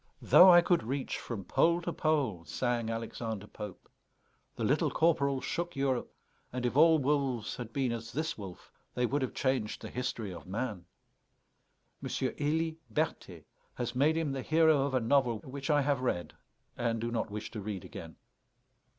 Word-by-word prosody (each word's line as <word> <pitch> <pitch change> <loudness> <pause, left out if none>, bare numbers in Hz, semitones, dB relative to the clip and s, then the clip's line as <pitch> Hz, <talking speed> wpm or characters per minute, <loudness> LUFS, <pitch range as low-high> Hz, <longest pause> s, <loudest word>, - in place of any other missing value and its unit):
"Though 185 - +8
I 175 0 +8
could 175 0 +2
reach 130 +4 -3
from 105 -6 -6
pole 170 +1 +3
to 170 - -2
pole," 140 - 0
sang 115 - -1
Alexander 115 -2 -4
Pope; 105 -2 -9 0.7
the - - -4
Little - - +2
Corporal 140 -5 +2
shook 170 0 -3
Europe; 135 -2 -1 0.4
and 125 0 -3
if 120 - -1
all 160 +2 +7
wolves 135 -5 0
had 120 -2 -6
been 130 -1 0
as 115 -1 -5
this 160 +6 -2
wolf 95 -4 -10 0.2
they 125 - +2
would 140 +4 0
have 130 - -3
changed 130 -5 -1
the - - -7
history 115 -5 -3
of 90 - -10
man. 105 -2 -4 1.2
M. - - -4
Élie 160 +2 -1
Berthet 110 - -3 0.3
has 120 -1 -3
made 150 +5 +3
him 160 -3 0
the 135 -1 -3
hero 160 0 +4
of 135 - -2
a - - +4
novel, 120 -1 +2
which 140 +3 -7
I 145 -1 +4
have 140 -2 +1
read, 90 -9 -2 0.4
and 115 -1 -1
do 115 +1 -2
not 115 -2 -1
wish 105 +1 -6
to 110 - -5
read 100 -2 -5
again. 80 -7 -9
125 Hz, 175 wpm, -31 LUFS, 115-145 Hz, 1.2 s, Though